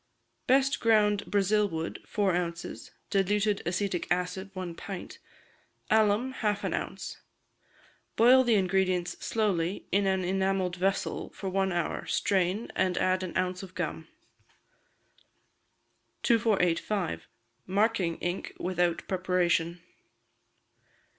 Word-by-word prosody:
Best 270 +2 +3
ground 210 -3 +3
Brazil 205 +1 +2
wood, 165 -1 -4
four 200 -4 +1
ounces; 175 0 -4 0.2
diluted 205 +1 +1
acetic 180 0 -1
acid, 180 +2 -1
one 185 -2 -4
pint; 190 +2 -8 0.7
alum, 220 +3 +3
half 210 -5 -1
an - - -1
ounce. - - -5 0.9
Boil 255 +3 +7
the 235 -3 +3
ingredients 185 -2 +1
slowly 195 -5 0
in 200 0 +2
an 190 -1 +1
enamelled 190 0 0
vessel 195 +2 -1
for 195 - -5
one 190 0 +1
hour, 175 -2 -2
strain, 190 +3 0
and 185 -1 +1
add 185 0 +2
an 185 -2 -4
ounce 185 0 -1
of 190 -2 -11
gum. 160 -2 -4 2.2
2485. 205 -5 +1 0.4
Marking 195 -3 +1
Ink 175 +1 -4
without 175 -1 0
Preparation. 180 -2 +1
190 Hz, 110 wpm, -29 LUFS, 180-205 Hz, 2.2 s, Boil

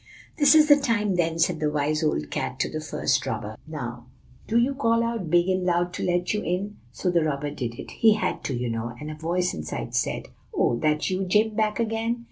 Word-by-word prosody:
"'This 290 +1 +7
is 305 -1 +7
the 290 -1 +8
time, 230 -7 +1
then,' 165 -2 0
said 165 0 +1
the 150 - +1
wise 150 +1 0
old 75 - -1
cat 65 - -3
to - - +1
the - - -5
first - - 0
robber. 105 +1 -4
'Now 125 -6 -6 0.4
do 225 - +1
you 245 +4 +3
call 230 -4 +2
out 230 -7 -2
big 175 +2 +4
and 185 -1 +1
loud 175 0 +1
to - - -4
let 175 +1 0
you 210 - -1
in.' 195 +4 -3
So 180 +8 -1
the 170 -2 +3
robber 145 -1 -2
did 120 -5 -4
it; - - -8
he 220 -2 +4
had - - -2
to, 135 - -1
you 125 0 -2
know; 115 +1 -4
and 150 +1 -6
a - - -7
voice 175 +3 -1
inside 75 0 -5
said, - - -1 0.3
'Oh! - - +2
that 150 +6 0
you, 190 +1 -1
Jim, 210 +4 +3
back 215 0 0
again? 225 +1 -1
175 Hz, 230 wpm, -25 LUFS, 150-215 Hz, 0.4 s, the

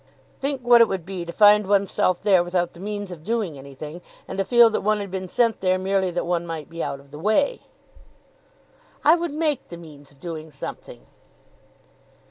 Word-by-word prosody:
"Think 275 -1 -2
what 240 -1 +7
it 230 - +6
would 190 -5 -4
be 185 -2 -5
to 170 - -6
find 210 +1 +5
one's 200 -1 +2
self 180 -1 +1
there 190 -4 +4
without 175 0 -1
the 170 - -14
means 205 0 -5
of 165 -3 -10
doing 215 -6 -2
anything, 140 +5 -9 0.3
and - - -6
to - - +3
feel 235 +1 +6
that - - -1
one 215 +1 +1
had 200 -2 -6
been 185 -1 -5
sent 230 +1 +1
there 185 -1 +2
merely 190 0 0
that 175 0 -3
one 170 0 -1
might 160 -2 -6
be 165 0 -5
out 140 - -4
of 140 0 -20
the 150 - -9
way." 215 - +1 1.4
"I 310 - +8
would 345 0 -2
make 300 -2 -1
the 170 - -9
means 150 -4 -14
of 140 - -23
doing 160 -1 -7
something." 135 -2 -9
185 Hz, 205 wpm, -23 LUFS, 165-215 Hz, 1.4 s, I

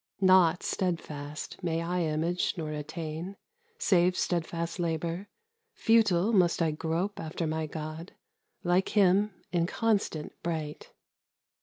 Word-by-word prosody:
Naught 185 -3 +5
steadfast 155 -5 -3
may 165 -2 0
I 180 +1 -1
image 165 +2 0
nor 155 -2 -3
attain 160 +4 -5 0.4
Save 180 - +3
steadfast 170 0 -1
labour; 170 +3 -2 0.5
futile 220 -2 +3
must 180 -4 +4
I 165 -2 +2
grope 165 +6 -2
After 160 +1 -3
my 155 0 -1
god, 155 +3 -6 0.5
like 180 +2 +2
him, 200 +2 +5 0.2
inconstant 175 -1 0
bright. 160 -3 -4
170 Hz, 110 wpm, -29 LUFS, 160-185 Hz, 0.5 s, Naught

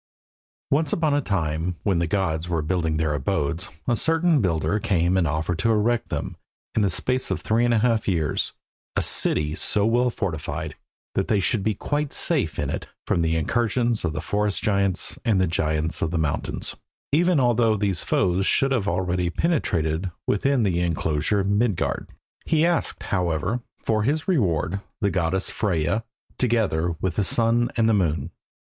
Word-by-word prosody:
Once 150 +1 +2
upon 155 -3 +1
a 145 - +2
time, 85 - -1
when 95 -5 +1
the 85 - 0
gods 85 -3 -1
were 85 -3 0
building 80 -1 0
their 80 -1 0
abodes, 80 +4 -1 0.2
a 120 - +3
certain 165 +2 +3
builder 90 +3 0
came 90 -2 +1
and 90 -3 +2
offered 80 +3 -2
to 115 - +1
erect 115 +2 +1
them, - - -4 0.4
in 110 - +1
the 100 - +3
space 125 +7 0
of - - -2
three 115 +2 +2
half 115 -1 +2
years, 80 -6 0 0.4
a - - +1
city 75 0 0
so 100 +5 +2
well 120 +2 +3
fortified 90 -10 -4 0.4
that - - 0
they 105 - +2
should 100 +4 0
be 105 +1 0
quite 145 +6 -2
safe 125 - +1
in 75 - -1
it 70 - -4 0.2
from 85 - +1
the 80 0 +1
incursions 120 +6 0
of 85 -3 -1
the 80 0 -4
forest 105 +2 -1
giants 100 -3 +1
and 105 -5 +2
the 95 - +3
giants 80 -1 0
of - - +1
the 85 - -2
mountains, 75 -3 -1 0.4
even 170 +2 +3
although 120 -3 +3
these 95 -4 0
foes 95 +1 +1
should 135 0 +2
have 115 -7 0
already 90 -1 0
penetrated 85 - 0 0.2
within 135 +4 +1
the 90 -4 +1
enclosure 85 +3 0
Midgard. 100 0 0 0.3
He 160 0 +2
asked, 175 -1 -1
however, 90 +4 -1 0.2
for 110 -1 0
his 150 +8 0
reward, 100 - +1 0.2
the 100 -1 +1
goddess 95 +1 0
Freyja, 100 +1 0 0.4
together 100 -9 +1
with 95 -3 -1
the 105 - +3
sun 115 +3 +2
and 115 - +3
moon. 85 -6 0
100 Hz, 165 wpm, -24 LUFS, 85-115 Hz, 0.4 s, a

